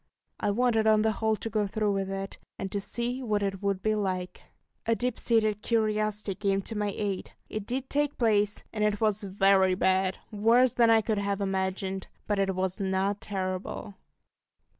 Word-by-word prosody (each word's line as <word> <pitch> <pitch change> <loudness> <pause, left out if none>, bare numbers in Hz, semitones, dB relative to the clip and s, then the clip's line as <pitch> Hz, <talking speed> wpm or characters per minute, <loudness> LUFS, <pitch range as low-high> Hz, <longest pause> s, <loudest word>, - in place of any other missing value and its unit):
I - - 0
wanted 225 0 +2
on 215 -1 +5
the 220 - +3
whole 220 +1 0
to 215 - -6
go 210 -1 0
through 210 0 0
with 195 -1 -1
it, 195 0 -5 0.2
and 195 - -4
to 200 - -2
see 240 +5 -2
what 210 -4 0
it 195 -1 -2
would 200 -2 -1
be 215 - +2
like. 185 -3 -2 0.5
A 230 - +3
deep 245 0 -2
seated 215 -3 +2
curiosity 215 -2 0
came 195 0 0
to 225 - -5
my 210 -1 0
aid. 200 -1 -3 0.2
It 215 -2 -5
did 260 +2 -2
take 290 +1 0
place, 210 -3 +2
and 210 -2 -1
it 210 -1 +1
was 215 -1 +2
very 195 -1 +3
bad 190 0 +2
worse 230 +4 +4
than 235 -1 +4
I 225 -1 +6
could 215 -1 -1
have 200 0 -1
imagined; 190 -1 -2 0.2
but 205 -1 0
it 195 -1 +1
was 185 +1 -1
not 195 +1 0
terrible! 185 - -4
205 Hz, 185 wpm, -28 LUFS, 195-220 Hz, 0.5 s, I